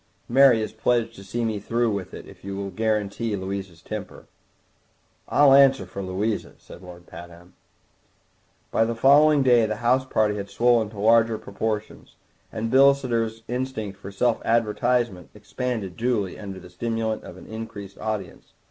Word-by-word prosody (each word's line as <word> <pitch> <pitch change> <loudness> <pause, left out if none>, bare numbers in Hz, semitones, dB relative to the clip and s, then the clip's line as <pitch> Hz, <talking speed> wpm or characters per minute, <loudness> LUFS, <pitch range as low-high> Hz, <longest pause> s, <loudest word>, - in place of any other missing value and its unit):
"Mary 125 -3 +5
is 110 - -6
pledged 115 +1 0
to 100 - -12
see 115 +4 -3
me 110 -2 -2
through 115 +3 0
with 100 -3 -4
it, - - -9
if - - -16
you 100 0 -5
will 100 0 -4
guarantee 110 +1 -1
Louisa's 95 -3 -6
temper." 105 -3 -7 1.0
"I'll 145 -2 +5
answer 135 -6 +5
for 95 +2 -7
Louisa," 100 +3 -3
said - - -14
Lord 90 -1 -12
Pabham. 85 +1 -13 1.2
By 115 - +3
the 115 +1 -2
following 145 +4 +5
day 120 -3 +4
the 110 - -2
house 120 +4 +2
party 110 -5 0
had 100 0 -6
swollen 115 0 +2
to 105 -1 -11
larger 115 +1 +4
proportions, 105 +1 -5 0.4
and 115 +1 -3
Bilsiter's 130 -5 +3
instinct 125 -5 -4
for 100 0 -9
self 115 +4 0
advertisement 115 -3 0
expanded 105 -2 -4
duly 115 -6 -1
under 95 -2 -7
the 90 -1 -14
stimulant 115 +3 -2
of 90 - -11
an - - -13
increased 105 -3 -8
audience. 105 -5 -5
110 Hz, 155 wpm, -24 LUFS, 100-120 Hz, 1.2 s, Mary